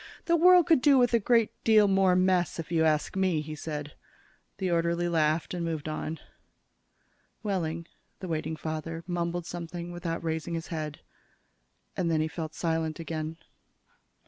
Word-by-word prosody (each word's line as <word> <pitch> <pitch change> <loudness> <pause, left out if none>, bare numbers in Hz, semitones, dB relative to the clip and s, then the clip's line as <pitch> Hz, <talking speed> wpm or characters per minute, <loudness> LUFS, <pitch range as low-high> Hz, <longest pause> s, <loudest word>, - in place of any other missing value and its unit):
"The 340 - +3
world 355 +1 +7
could 325 -7 +4
do 280 -1 +6
with 245 -1 +3
a 235 - +5
good 230 0 +3
deal 215 -2 +6
more 190 -2 +4
mess, 185 -1 +2
if 165 0 -6
you 165 -1 +3
ask 155 +1 +1
me," 185 -4 +2
he 155 +1 -5
said. 150 -1 -5 0.6
The 190 -2 -1
orderly 170 +1 +1
laughed 160 -1 +1
and 175 -1 -3
moved 160 -3 -3
on. 155 +1 -3 1.3
Wehling, 170 -5 -2 0.3
the 185 - -6
waiting 160 -1 -2
father, 160 +1 -5
mumbled 175 -1 -2
something 170 0 -6
without 170 -1 -4
raising 160 +1 -2
his 165 0 -5
head. 155 -3 -5 0.9
And 180 -3 0
then 160 -1 +2
he 155 - +1
fell 160 0 -5
silent 160 0 -2
again. 160 -1 -4
170 Hz, 160 wpm, -28 LUFS, 160-185 Hz, 1.3 s, world